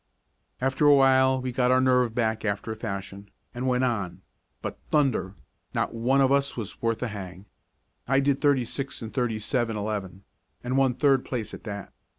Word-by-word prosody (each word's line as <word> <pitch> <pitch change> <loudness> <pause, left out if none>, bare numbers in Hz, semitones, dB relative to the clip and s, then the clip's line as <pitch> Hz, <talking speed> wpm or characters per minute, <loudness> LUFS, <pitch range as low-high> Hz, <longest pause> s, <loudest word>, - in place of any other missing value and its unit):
After 135 +3 +2
a 145 - +8
while 130 -1 +4
we 130 0 -3
got 125 0 +1
our 130 0 +5
nerve 125 -3 +3
back 110 -2 0
after 100 +1 -2
a - - -4
fashion, 100 -2 -6 0.2
and 125 +2 -3
went 125 0 +2
on, 100 -8 -2 0.4
but, - - -5
thunder! 130 -10 +1 0.4
not - - 0
one 125 +4 +2
of 135 0 +4
us 140 -1 +1
was 110 -4 -6
worth 115 +1 0
a - - 0
hang. 95 -2 -8 0.6
I 135 +2 +3
did 140 0 +1
thirty 140 -4 +3
six 135 +1 -4
and 110 - -7
thirty 120 -4 0
seven, 115 0 -1
eleven, 100 -3 -4 0.4
and 125 +1 -2
won 135 -2 +3
third 135 -2 +3
place 120 -5 -4
at - - -10
that. 100 -3 -6
120 Hz, 185 wpm, -26 LUFS, 110-130 Hz, 0.6 s, a